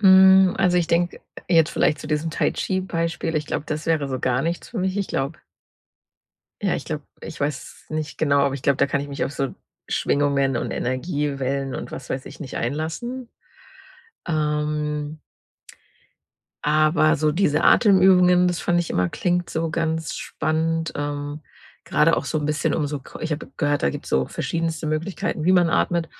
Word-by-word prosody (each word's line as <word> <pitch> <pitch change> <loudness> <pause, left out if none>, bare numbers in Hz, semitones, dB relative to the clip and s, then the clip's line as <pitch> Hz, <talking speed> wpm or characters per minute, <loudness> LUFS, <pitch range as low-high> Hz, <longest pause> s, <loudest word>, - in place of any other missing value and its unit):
Hm. 190 -1 +7
Also, 180 -2 +3
ich 170 -2 +2
denke 175 +1 +1 0.3
jetzt 165 -3 +4
vielleicht 150 - +1
zu - - -8
diesem 155 +2 -1
Tai-Chi-Beispiel, 165 -2 -1
ich 155 -1 -1
glaube, 150 - -3
das 155 +1 -4
wäre 150 -4 +1
wohl 130 - -3
gar 125 +2 +1
nichts 170 +1 -3
für 225 - -5
mich. 190 +1 -1
Ich 200 - -1
glaube 135 +4 -2 1.2
ja, 195 - +1
ich - - -4
glaube 150 -3 -4 0.2
ich 160 -2 -8
weiß 145 +1 -4
nicht 155 -1 -4
genau, 140 -2 +3
aber 140 -1 +1
ich 135 - -7
glaube, 140 -1 +3
da - - +4
kann 140 - -1
ich 145 - -6
mich 140 -1 -2
auf 140 - -4
so 135 -1 -3 0.3
Schwingungen 140 -2 +1
und - - -2
Energiewellen 135 -1 -2
und - - -6
was 135 - -7
weiß 130 - -3
ich - - -11
nicht 135 - -6
einlassen, 160 - -3 1.0
ähm 150 -1 -1 1.4
aber 155 +1 +3
so 150 +1 +1
diese 165 -4 +2
Atemübungen, 180 -3 +5
das 175 - -2
fand 175 0 +2
ich 170 - -4
immer 90 -1 +1
klingt 175 - -1
so 160 0 -1
ganz 160 -1 -1
spannend, 160 +1 -1
ähm, 145 +1 -4 0.4
grade 165 +2 +3
auch - - -2
so 155 - -1
'n 150 - -2
bisschen 150 0 0
um 150 -3 0
so 145 0 -3
co - - -12
ich 160 - -3
habe 150 - -3
gehört, 145 -2 0
da 70 - +3
gibt's - - -7
so 65 0 +1
verschiedenste 165 -1 -3
Möglichkeiten, 155 0 -2
wie 185 - +4
man 175 -3 +4
atmet, 170 -1 +1
155 Hz, 180 wpm, -23 LUFS, 145-170 Hz, 1.4 s, Hm